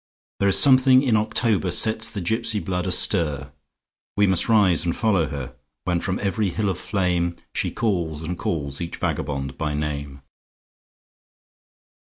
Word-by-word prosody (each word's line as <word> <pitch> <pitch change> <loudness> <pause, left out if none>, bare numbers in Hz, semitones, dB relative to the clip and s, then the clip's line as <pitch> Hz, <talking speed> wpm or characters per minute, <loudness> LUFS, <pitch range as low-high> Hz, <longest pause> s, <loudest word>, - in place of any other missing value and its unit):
There 100 - +2
is 95 - +6
something 130 -1 +6
in 125 -5 +1
October 110 -2 +1
sets 110 +3 +3
the 100 -4 -6
gypsy 110 +3 0
blood 90 -2 -3
astir; 75 -7 +2 0.7
We 105 - +4
must 95 +3 0
rise 100 -7 +3
and 85 -1 -2
follow 100 -8 +1
her, 70 -3 -7 0.3
When 90 +1 -1
from 90 +1 -3
every 100 0 -1
hill 105 +3 -2
of 90 -2 -4
flameShe 90 -4 -3
calls 85 -8 -2
and 90 +3 -4
calls 70 -5 -4
each 85 - -5
vagabond 70 -1 -4
by 75 -2 -2
name. 70 -2 -5
90 Hz, 145 wpm, -22 LUFS, 75-110 Hz, 0.7 s, is